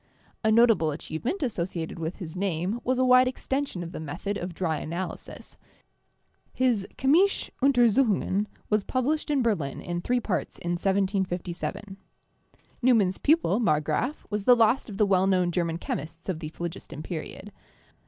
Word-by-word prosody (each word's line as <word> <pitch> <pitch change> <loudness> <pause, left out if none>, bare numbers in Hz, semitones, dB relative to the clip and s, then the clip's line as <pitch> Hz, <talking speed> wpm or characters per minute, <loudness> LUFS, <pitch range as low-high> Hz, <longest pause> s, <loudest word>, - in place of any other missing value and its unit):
A 220 - +3
notable 225 -8 +5
achievement 160 - -3
as 245 -5 -1
sociated 170 -2 -4
with 165 +2 -3
his 175 -4 -8
name 190 +4 -1
was 255 0 +1
a 255 - +3
wide 255 0 +6
extension 265 -6 -2
of 170 - -7
the - - -6
method 170 +7 -4
of 180 -2 -4
dry 165 -4 -1
analysis. 170 +5 -6 0.9
His 240 -7 +1
'Chymische 330 +9 +3
Untersuchungen' 235 -6 +3 0.2
was 210 -1 +1
published 285 +7 -1
in 280 -4 +2
Berlin 165 -12 -1
in 175 0 -4
three 245 +6 +1
parts 205 -5 -3
in 175 - -4
1757. 190 +1 -2 0.8
Neumann's 220 -7 +3
pupil, 290 - +3
Marggraf, 155 - 0
was 210 -1 -2
the 250 - +8
last 230 +2 +3
of 200 - -7
the 210 - +4
well 190 -1 +3
known 180 -2 +2
German 170 -2 -1
chemists 165 0 -6
of 175 -4 -2
the 155 -2 -5
phlogiston 165 -2 -7
period. 185 +4 -7
195 Hz, 155 wpm, -27 LUFS, 170-245 Hz, 0.9 s, the